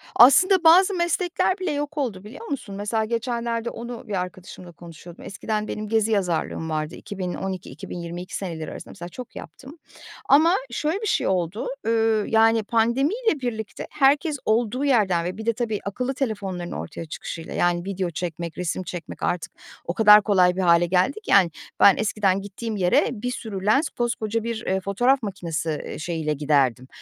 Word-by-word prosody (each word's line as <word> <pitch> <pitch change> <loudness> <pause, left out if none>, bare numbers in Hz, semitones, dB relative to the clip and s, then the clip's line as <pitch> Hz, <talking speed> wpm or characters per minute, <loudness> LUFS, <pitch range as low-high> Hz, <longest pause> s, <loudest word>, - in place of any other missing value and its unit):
Aslında 370 - +6
bazı 365 +5 +6
meslekler 360 +1 0
bile 370 -4 -1
yok 290 +1 -3
oldu 215 -9 -2
biliyor 245 - -10
musun? 240 -8 -5
Mesela 210 +2 -1
geçenlerde 235 0 -2
onu 235 0 -8
bir 210 - -5
arkadaşımla 180 0 -9
konuşuyordum. 170 0 -13
Eskiden 210 +2 -3
benim 215 0 -4
gezi 220 0 +1
yazarlığım 175 -4 -1
vardı 155 0 -3
2012, 190 -1 -5
2022 175 +1 -7
seneleri 165 -5 -5
arasında - - -9
mesela 175 +1 -9
çok 250 +6 -10
yaptım 275 +5 -11 0.5
ama 320 +6 +6 0.2
şöyle 310 - -1
bir 435 - -2
şey - - +1
oldu, 185 +2 -1 0.2
ııı, 225 -2 +2
yani, 225 0 +4
pandemiyle 275 - +1
birlikte 220 -4 -5
herkes 285 +2 +2
olduğu 235 +5 +1
yerden 195 -10 +2
ve 185 +3 -4
bir 220 - -7
de, 230 - +2
tabii, 220 -2 -2
akıllı 250 +6 -2
telefonların 200 -9 -3
ortaya 80 - -6
çıkışıyla, 165 +1 -7
yani, 175 0 +1
video 190 -2 -2
çekmek, 170 0 -5
resim 180 +1 -2
çekmek 175 -2 -7
artık 175 - -1 0.3
o 170 - -2
kadar 210 +1 +8
kolay 185 -4 +3
bir 190 - -1
hâle 170 -1 +5
geldi 185 - +1
ki, - - -5
yani, 190 -4 +6 0.3
ben 200 - +7
eskiden 205 -3 +1
gittiğim 210 +3 -5
yere 180 -3 +3
bir 245 +1 -4
sürü 205 -6 -6
lens, 270 +9 +3
koskoca 230 -2 -2
bir, 230 -1 -4
eee, 190 +1 0
fotoğraf 245 +7 +2
makinesi, 170 -5 -3 0.2
eee, - - -7
şeyiyle 160 -2 -2
giderdim, 135 -4 +1
210 Hz, 165 wpm, -24 LUFS, 180-245 Hz, 0.5 s, kadar